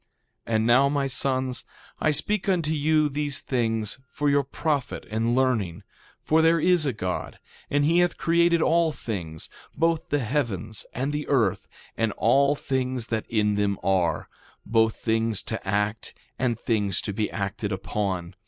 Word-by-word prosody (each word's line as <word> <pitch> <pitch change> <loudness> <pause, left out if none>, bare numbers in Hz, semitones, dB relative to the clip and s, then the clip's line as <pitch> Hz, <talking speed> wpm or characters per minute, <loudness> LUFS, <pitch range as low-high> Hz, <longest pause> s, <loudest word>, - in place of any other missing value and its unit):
2:14 115 - 0
And 110 0 +2
now, 130 +4 +5
my 140 -1 0
sons, 130 -2 0 0.4
I 155 - +2
speak 205 +8 +1
unto 170 -5 +1
you 155 0 +2
these 145 -1 -2
things 115 -3 -1
for 145 0 0
your 140 0 +3
profit 140 -1 -2
and 115 +2 +1
learning; 115 -10 0 0.4
for 160 +1 +3
there 165 +1 +4
is 175 -2 +3
a - - +2
God, 90 -5 -4 0.3
and 145 0 +2
he 165 +3 +4
hath 175 -1 +2
created 170 0 +3
all 165 -1 +3
things, 85 - -6 0.3
both 165 0 0
the 145 - +2
heavens 110 - -2
and 135 +4 -1
the 150 0 -3
earth, 115 -9 +1 0.3
and 110 -2 0
all 140 +5 +3
things 130 -4 -2
that 110 -1 -2
in 105 -2 +2
them 100 -1 0
are, 90 -5 +1 0.4
both 110 0 +2
things 115 -2 0
to 110 -3 -5
act 105 +2 -1 0.2
and 120 -3 0
things 105 -6 0
to 100 - -4
be 105 +1 -1
acted 100 +1 -3
upon. 95 -2 -3
125 Hz, 160 wpm, -25 LUFS, 105-145 Hz, 0.4 s, now